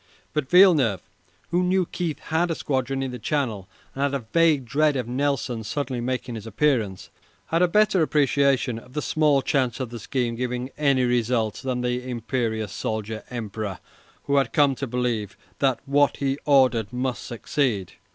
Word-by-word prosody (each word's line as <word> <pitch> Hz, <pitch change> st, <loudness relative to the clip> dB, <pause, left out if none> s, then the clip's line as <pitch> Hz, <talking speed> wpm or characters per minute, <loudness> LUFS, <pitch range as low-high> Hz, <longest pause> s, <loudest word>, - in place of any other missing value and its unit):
But 150 Hz, -3 st, -2 dB
Villeneuve, 155 Hz, -, +5 dB, 0.5 s
who 175 Hz, +1 st, +2 dB
knew 185 Hz, 0 st, +2 dB
Keith 165 Hz, -4 st, -3 dB
had 165 Hz, +2 st, -1 dB
a 165 Hz, -, -1 dB
squadron 135 Hz, -1 st, -1 dB
in 130 Hz, -, -3 dB
the 125 Hz, -, -7 dB
Channel, 110 Hz, -6 st, -2 dB, 0.2 s
and 135 Hz, -, -5 dB
had 140 Hz, 0 st, +1 dB
a 130 Hz, -5 st, -4 dB
vague 160 Hz, -5 st, +4 dB
dread 145 Hz, +5 st, +2 dB
of 125 Hz, -3 st, -2 dB
Nelson 130 Hz, -2 st, -1 dB
suddenly 130 Hz, +1 st, -3 dB
making 125 Hz, 0 st, -3 dB
his 110 Hz, -1 st, -7 dB
appearance, 110 Hz, -6 st, 0 dB, 0.4 s
had 165 Hz, +2 st, +2 dB
a 180 Hz, -, +5 dB
better 205 Hz, 0 st, +3 dB
appreciation 140 Hz, -5 st, +2 dB
of 125 Hz, +2 st, -17 dB
the 150 Hz, -, -2 dB
small 150 Hz, -3 st, +2 dB
chance 130 Hz, -3 st, 0 dB
of 125 Hz, -3 st, -4 dB
the 120 Hz, -, -6 dB
scheme 120 Hz, +1 st, -1 dB
giving 125 Hz, +2 st, -3 dB
any 140 Hz, -3 st, +2 dB
result 120 Hz, -3 st, 0 dB
than 130 Hz, -2 st, -1 dB
the 125 Hz, +1 st, -2 dB
imperious 115 Hz, -3 st, -2 dB
soldier 110 Hz, +1 st, -4 dB
Emperor, 110 Hz, -5 st, -4 dB, 0.5 s
who 140 Hz, 0 st, +1 dB
had 135 Hz, -5 st, +1 dB
come 145 Hz, -2 st, +4 dB
to 135 Hz, +1 st, -4 dB
believe 120 Hz, -4 st, -2 dB, 0.2 s
that 135 Hz, -3 st, +2 dB
what 145 Hz, 0 st, +2 dB
he 140 Hz, 0 st, -1 dB
ordered 130 Hz, -6 st, +4 dB
must 125 Hz, 0 st, -2 dB
succeed. 120 Hz, -, -2 dB
130 Hz, 170 wpm, -24 LUFS, 115-145 Hz, 0.5 s, Villeneuve